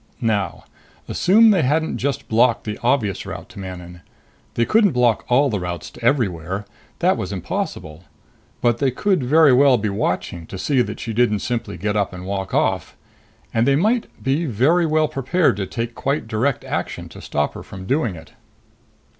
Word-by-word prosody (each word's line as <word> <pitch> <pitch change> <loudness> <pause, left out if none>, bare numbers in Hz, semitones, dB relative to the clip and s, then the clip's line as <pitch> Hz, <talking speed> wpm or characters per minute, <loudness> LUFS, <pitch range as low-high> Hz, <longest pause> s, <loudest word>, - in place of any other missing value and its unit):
Now. 105 -7 -1 0.4
Assume 220 +4 +5
they 190 -5 +3
hadn't 155 +4 0
just 140 -2 -2
blocked 115 +1 +3
the 105 -1 -5
obvious 120 -6 +1
route - - -8
to 115 -4 -11
Manon. 90 -2 -8 0.5
They 115 - +2
couldn't 210 - +3
block 125 -3 +2
all 135 +2 +3
routes 90 -5 -4
to - - -14
everywhere; 95 - 0 0.3
that - - +2
was 95 - -4
impossible. 80 -3 -5 0.6
But 120 -1 +2
they 135 - +2
could 185 +7 0
very 145 +2 +5
well 135 0 +5
be 105 -1 -2
watching 90 -4 -2
to 95 - -7
see 125 +8 +1
that - - -4
she 115 - -4
didn't 110 -3 +2
simply 120 -2 -3
get 105 +4 -2
up 100 -3 0
and 90 0 -8
walk 95 0 -3
off. - - 0 0.6
And 115 +1 +2
they 140 - +4
might 215 - +1 0.2
be 140 +6 +1
very 150 - +2
well 155 0 +2
prepared 135 - +1
to 95 -2 -3
take 115 +4 -4
quite 140 -1 -2
direct 115 +5 0
action - - -4
to - - -12
stop 75 0 -1
her - - -8
from 95 -1 -10
doing 125 - 0
it. 80 0 -13
115 Hz, 180 wpm, -21 LUFS, 95-140 Hz, 0.6 s, Assume